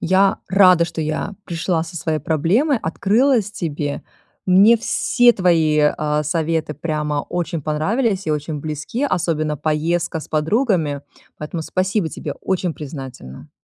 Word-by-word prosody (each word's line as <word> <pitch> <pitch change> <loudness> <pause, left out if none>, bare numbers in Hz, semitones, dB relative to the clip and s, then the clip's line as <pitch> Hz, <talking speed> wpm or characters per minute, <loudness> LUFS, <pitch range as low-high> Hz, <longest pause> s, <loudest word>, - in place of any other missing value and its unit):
Я 190 +3 +3
рада, 185 -3 +5
что 170 - -5
я 155 +6 -3
пришла 170 0 -1
со 165 +1 -8
своей 160 -2 -1
проблемой, 180 - +1
открылась 215 - +2
тебе. 150 -5 -4 0.4
Мне 195 +5 +6
все 240 +2 +3
твои, 165 -6 +2 0.2
а, 150 0 0
советы 160 0 -1
прямо 150 -1 -2
очень 170 -2 -2
понравились 195 - 0
и - - 0
очень 150 0 -3
близки, 155 - -3
особенно 155 - -1
поездка 160 +3 -1
с - - -11
подругами, 160 - 0 0.4
поэтому 155 +2 -5
спасибо 185 +1 -1
тебе, - - -6
очень 185 -2 -2
признательна. 130 - -9
165 Hz, 130 wpm, -20 LUFS, 150-190 Hz, 0.4 s, Мне